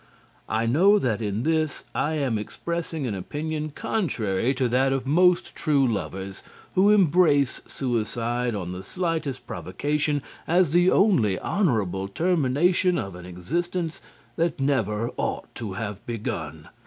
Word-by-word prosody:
I 110 +1 0
know 180 - +5
that 115 - 0
in 105 +1 -2
this 155 -1 0
I 155 +2 0
am 130 -7 0
expressing 165 +6 -4
an 115 - -2
opinion 150 - -4
contrary 120 - -1
to 130 -1 +1
that 130 +3 +2
of 135 -1 -1
most 180 +5 +3
true 145 -4 +2
lovers 95 -3 -4 0.3
who 195 +2 +4
embrace 165 - +4
suicide 120 -1 -1
on 90 -3 -4
the 90 0 -6
slightest 160 - -3
provocation 150 -1 -1 0.2
as 175 -2 +3
the 175 +2 +5
only 125 - +3
honourable 105 - 0
termination 175 - +2
of 95 -1 -4
an 90 0 -10
existence 165 - -3 0.4
that 170 -2 0
never 115 -5 0
ought - - -3
to 110 -5 -5
have 105 0 -5
begun. 115 -3 -5
135 Hz, 135 wpm, -25 LUFS, 110-165 Hz, 0.4 s, know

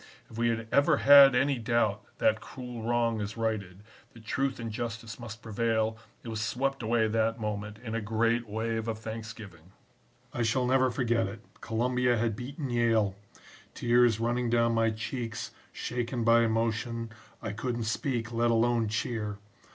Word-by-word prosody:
If 110 - -10
we 120 - +2
had 115 0 -2
ever 145 +2 +4
had 140 -2 +8
any 135 0 +2
doubt 115 -3 +1 0.2
that 110 0 +2
cruel 125 -3 -8
wrong 115 -1 +1
is 105 +2 -5
righted, 105 -4 -3 0.3
that 115 -2 -15
truth 135 +3 -1
and 115 -1 -4
justice 115 0 -5
must 115 -1 -9
prevail, 110 0 0 0.3
it - - -10
was 110 -1 -3
swept 130 +5 -1
away 115 0 +2
that 115 +1 0
moment 105 -1 -4
in 115 0 -7
a 115 - -1
great 115 +2 0
wave 110 +1 -2
of 110 -1 -2
thanksgiving. 110 -6 -9 0.6
"I 120 - -2
shall 120 +3 +1
never 130 +1 +3
forget 120 -3 +1
it 105 +3 -8 0.2
Columbia 125 +2 +1
had 110 -1 0
beaten 135 +3 -5
Yale! 115 -4 +2 0.6
Tears 120 -2 +3
running 120 +1 0
down 115 0 +3
my 115 0 +3
cheeks, 115 +1 -4 0.2
shaken 120 0 -3
by 115 0 +5
emotion, 115 +1 -1 0.3
I 110 - -4
couldn't 120 +2 -3
speak, 120 +1 -2
let 120 0 +1
alone 115 0 +2
cheer. 105 -1 -2
115 Hz, 160 wpm, -29 LUFS, 110-120 Hz, 0.6 s, had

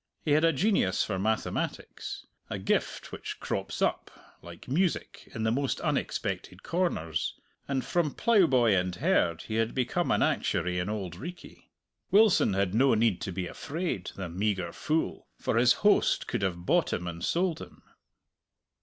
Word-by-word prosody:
He 150 - +1
had 155 +2 +4
a 165 - +5
genius 165 - +2
for 95 -3 -2
mathematics 110 +3 -3 0.2
a - - -3
gift - - -1
which - - -6
crops - - -3
up, - - 0 0.3
like 85 -1 -12
music, 170 +7 -1
in 110 - -2
the 110 - +2
most 135 +3 0
unexpected - - -2
corners 80 - -1 0.3
and 135 -2 -1
from 170 -5 0
plough 220 -7 +4
boy 120 -7 +4
and 90 -1 0
herd 85 -1 +1
he 110 - -3
had 115 0 0
become 130 -2 0
an - - +3
actuary 90 +1 0
in 90 +3 -2
Auld 95 -5 -4
Reekie. 175 - -10 0.4
Wilson 205 - +5
had 95 -1 +1
no 130 +2 +4
need 110 -4 +2
to 105 -4 -3
be 90 +1 -3
afraid, 150 - -4
the 95 -2 -4
meagre 95 +1 -1
fool, 160 +1 -2
for - - -1
his - - +6
host - - +4
could - - -2
have 90 -2 -2
bought - - +2
him 90 - -2
and 85 -1 -5
sold 170 -2 0
him. - - -12
110 Hz, 165 wpm, -29 LUFS, -, 0.4 s, his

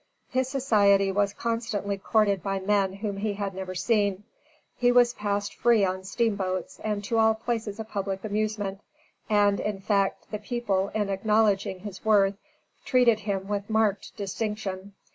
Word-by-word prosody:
His 260 0 0
society 205 -8 +3
was 200 0 +1
constantly 230 -3 -2
courted 200 -1 +1
by 195 -1 -2
men 195 -1 +1
whom 200 0 -4
he 205 +1 -1
had 200 -1 -4
never 185 0 -6
seen; 205 -1 +1 0.5
he 245 0 +3
was 245 -1 +5
passed 205 -1 -2
free 230 -4 +3
on 190 0 -2
steamboats 190 -4 -2
and 210 -1 -2
to 225 +3 0
all 220 0 +4
places 225 -2 -3
of 220 - -5
public 195 -2 -3
amusement; 210 -2 -2 0.5
and, 205 -1 +3
in 210 -2 -2
fact, 195 0 0
the 210 - -3
people, 205 -4 -1
in 210 -2 0
acknowledging 200 -2 +1
his 200 -2 -8
worth, 200 -3 +4 0.5
treated 245 -4 +4
him 195 -2 -3
with 205 0 -3
marked 220 -2 0
distinction. 200 -1 -4
205 Hz, 155 wpm, -27 LUFS, 195-220 Hz, 0.5 s, was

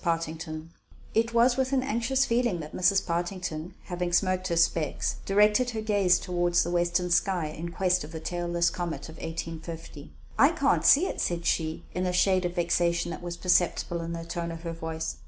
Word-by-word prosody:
SEEKING 170 -2 +3 0.2
A - - -9
COMET 155 0 -7 0.5
It 230 +1 +1
was 240 +2 +4
with 265 0 0
an 260 -1 +2
anxious 265 +1 +1
feeling 235 -7 +1
that 155 -1 -8
Mrs. 190 +2 +2
Partington, 175 -1 -3
having 175 -1 -3
smoked 185 +1 +1
her 170 - -1
specs, 165 -2 +1
directed 210 +5 +4
her 225 -2 -3
gaze 205 -4 +3
toward 175 -1 -1
the 175 - +3
western 175 +1 +1
sky, 180 -1 +2
in 165 +2 -6
quest 180 +1 +1
of 150 - -9
the 160 - -6
tailless 175 0 0
comet 175 -2 -4
of 160 - -11
1850. 165 -2 -7 0.3
"I 285 +4 +6
can't 285 -4 +2
see 305 +7 +6
it," - - -3
said 170 -1 -2
she; 160 -1 0
and 180 0 -1
a 180 - -1
shade 185 0 +3
of 175 0 -3
vexation 170 -1 +1
was 175 -1 -5
perceptible 175 -1 +1
in 165 0 -4
the 165 0 -5
tone 170 0 -4
of 165 0 -8
her 165 -1 -4
voice. 160 0 -4
175 Hz, 195 wpm, -27 LUFS, 165-195 Hz, 0.5 s, I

